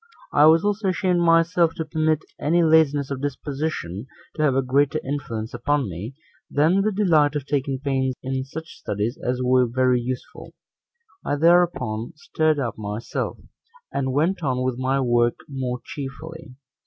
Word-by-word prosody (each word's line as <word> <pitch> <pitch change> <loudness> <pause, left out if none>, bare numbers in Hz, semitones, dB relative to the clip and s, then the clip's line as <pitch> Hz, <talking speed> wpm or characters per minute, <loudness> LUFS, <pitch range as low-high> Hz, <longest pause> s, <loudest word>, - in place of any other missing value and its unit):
I 150 +1 +6
was 165 +4 +5
also 205 0 0
ashamed 185 -1 +1
myself 165 0 +3
to 160 - -3
permit 155 0 0
any 170 +3 +2
laziness 150 -3 +3
of 135 -1 -3
disposition 140 - -4 0.3
to 155 - -4
have 145 -4 +3
a 135 - +2
greater 140 +4 +2
influence 115 -6 -4
upon 135 +2 0
me, 100 +8 -7 0.3
than 160 +7 +3
the 215 +2 +1
delight 160 -8 +3
of 145 -2 -2
taking 140 -2 -1
pains 130 -2 -1
in 130 0 -2
such 160 +5 -9
studies 105 +5 -3
as 125 +1 -1
were 125 0 +3
very 125 +1 +2
useful: 125 +1 -7 0.7
I - - -1
thereupon 155 -8 +2
stirred 155 0 0
up 125 -6 -3
myself, 105 +2 -4 0.5
and 130 -1 -1
went 165 +8 +1
on 130 -4 -1
with 130 -1 -2
my 130 +1 +1
work 120 -2 +2
more 130 -3 -3
cheerfully. 150 +1 -8
140 Hz, 155 wpm, -23 LUFS, 125-160 Hz, 0.7 s, I